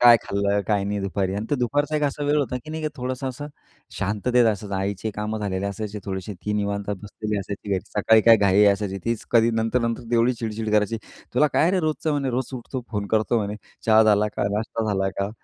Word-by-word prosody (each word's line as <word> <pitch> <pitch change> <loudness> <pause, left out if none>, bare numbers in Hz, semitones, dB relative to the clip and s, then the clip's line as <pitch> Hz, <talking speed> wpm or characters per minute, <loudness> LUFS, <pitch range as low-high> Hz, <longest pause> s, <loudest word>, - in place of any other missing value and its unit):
काय 120 -1 +9
खाल्लं? 100 0 0
काय 100 -2 +2
नाही? 100 0 -2
दुपारी 95 -1 -1
आणि 105 +2 -3
तर - - +3
दुपारचा 145 +5 0
एक 150 - -1
असा 145 0 -1
वेळ 145 +1 +2
होता, 130 -3 -1
की 155 - -8
नाही 160 0 -4
का 155 - 0
थोडंसं 130 +1 -3
असं 140 +3 -6 0.5
शांततेत 110 +5 +2
असायचं. 105 -2 -1
आईचे 100 +2 -2
कामं 105 +1 -2
झालेली 100 -2 -2
असायची 105 +1 -4
थोडीशी. 95 +1 -4
ती 105 - -1
निवांत 100 -1 -2
बसलेली 105 +1 -4
असायची 100 +1 -6
घरी. 95 -2 +1
सकाळी 110 +2 +4
काय 115 - +10
घाई 100 0 +4
असायची. 100 -1 -3
तीच 115 -2 -2
कधी 115 -1 +5
नंतर, 115 +2 +1
नंतर 115 0 -1
तेव्हडी 120 +1 +3
चिडचिड 110 -2 -4
करायची. 105 +2 +2 0.4
तुला 150 +4 +5
काय 165 - +3
रे 185 - +2
रोजचं 155 0 -1
म्हणे, 140 -3 0
"रोज 125 +1 -2
उठतो, 125 +1 -5
फोन 105 -3 -2
करतो" 110 +2 +1
म्हणे. 105 0 -3 0.3
"चहा 110 0 +7
झाला 105 -1 +4
का? 100 - +1
नाश्ता 110 +1 -2
झाला 95 0 0
का? 100 +1 -1
110 Hz, 220 wpm, -24 LUFS, 100-125 Hz, 0.5 s, काय